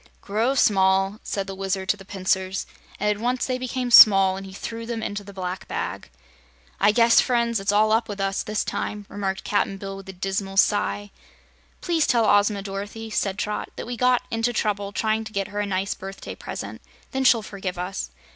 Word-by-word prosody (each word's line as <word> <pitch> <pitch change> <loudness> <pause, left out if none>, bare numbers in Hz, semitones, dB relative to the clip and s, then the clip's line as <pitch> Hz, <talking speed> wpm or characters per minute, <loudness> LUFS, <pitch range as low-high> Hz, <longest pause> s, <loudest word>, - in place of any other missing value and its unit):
"Grow 225 +7 0
small!" 195 -2 +3
said 195 -1 -3
the 195 - -6
Wizard 190 0 -3
to - - +4
the 195 - -13
pincers, 190 0 -1 0.3
and 210 - 0
at 210 0 0
once 250 +1 0
they 255 -1 -2
became 255 -1 -3
small 195 -4 +9
and 195 0 -7
he - - -10
threw 230 +4 -6
them 230 -2 -3
into 205 -1 -4
the 200 - -11
black 185 -1 -5
bag. - - -4 0.7
"I 205 +2 +5
guess, 230 +1 +5
friends, 235 -3 +1
it's 195 +1 0
all 215 +1 +3
up 225 0 +2
with 205 -1 -5
us, 195 0 0
this 215 0 -2
time," 205 0 -4
remarked 195 -1 -3
Cap'n 200 -1 0
Bill, 195 0 -6
with 195 0 -10
a - - -6
dismal 195 +1 -3
sigh. 205 0 +2 0.7
"Please 335 -3 +1
tell 235 -3 +3
Ozma, 205 -1 +3
Dorothy," 205 +3 -6
said 195 -2 -1
Trot, 210 0 -3
"that - - -6
we 245 +1 -4
got 250 +1 +2
into 225 +1 0
trouble 205 -3 -1
trying 220 +1 0
to 220 -1 -10
get 200 0 -2
her 205 0 -4
a 205 - -1
nice 190 0 -1
birthday 195 +1 -8
present. - - -7 0.3
Then 265 -1 -1
she'll 235 -3 +5
forgive 195 -3 -5
us. 180 - -4
205 Hz, 205 wpm, -24 LUFS, 195-225 Hz, 0.7 s, small